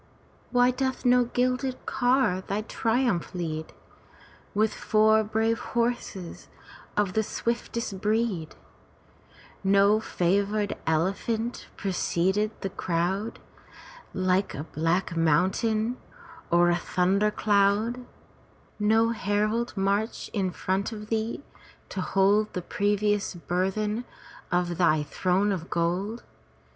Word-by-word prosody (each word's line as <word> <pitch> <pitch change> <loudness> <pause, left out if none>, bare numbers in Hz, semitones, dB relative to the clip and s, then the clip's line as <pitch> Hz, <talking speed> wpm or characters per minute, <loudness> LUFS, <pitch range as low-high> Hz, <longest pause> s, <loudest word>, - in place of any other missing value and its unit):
Why 245 0 +4
doth 260 0 -2
no 245 0 +5
gilded 255 +2 -1
car 250 -7 +2
thy 200 +3 -3
triumph 225 -5 0
lead, 160 -3 -4 0.8
With 215 +1 +2
four 220 0 +3
brave 225 +2 0
horses 235 -7 -3 0.5
of 205 -3 +1
the 220 - +2
swiftest 235 -2 -3
breed; 215 -7 0 1.1
No 200 +2 +4
favored 200 +1 0
elephant 200 +8 -1
precede 190 +2 0
the 195 - -2
crowd 185 +6 -1 0.7
Like 185 +1 0
a 145 - -4
black 165 +3 -1
mountain 215 +9 +1 0.5
or 175 0 +4
a - - +3
thunder 190 +4 +1
cloud; 210 +4 +2 0.8
No 220 +2 +3
herald 215 +1 -1
march 200 +3 -1
in 195 -3 0
front 190 +4 -2
of 210 -1 -8
thee 225 +4 -2 0.5
to 190 - -3
hold 200 +3 +2
The 180 - -3
precious 205 0 0
burthen 190 - -1 0.5
of 175 -1 0
thy 155 -4 +3
throne 185 +6 +1
of 180 -3 -4
gold? 180 +7 -1
205 Hz, 105 wpm, -27 LUFS, 185-225 Hz, 1.1 s, no